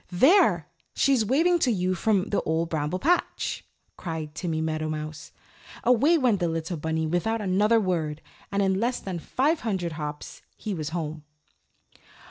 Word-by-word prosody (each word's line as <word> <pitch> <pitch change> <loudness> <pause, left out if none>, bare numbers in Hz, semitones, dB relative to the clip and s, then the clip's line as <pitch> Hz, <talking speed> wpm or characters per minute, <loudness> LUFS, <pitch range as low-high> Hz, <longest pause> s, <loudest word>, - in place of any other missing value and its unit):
"There! 265 - +4 0.3
She's 270 -5 +3
waving 330 - +3
to 255 - +2
you 185 -3 0
from 200 +1 +1
the 205 - +1
Old 160 +1 -1
Bramble 155 +2 -1
Patch," 340 - 0 0.3
cried 160 -3 -5
Timmy 165 -1 -2
Meadowmouse. 155 -1 -4 0.5
Away 260 +8 +4
went 245 - +2
the 175 - +1
little 165 +1 -3
bunny 160 +1 -1
without 175 +8 0
another 210 +3 +3
word 165 -7 -1 0.3
and 200 0 +1
in 190 0 +1
less 240 +3 0
than 185 -3 -5
five 295 - 0
hundred 190 -7 -2
hops 150 -1 -6 0.2
he 215 - -4
was 155 -4 -3
home. 160 -2 -4
185 Hz, 150 wpm, -26 LUFS, 160-225 Hz, 0.5 s, There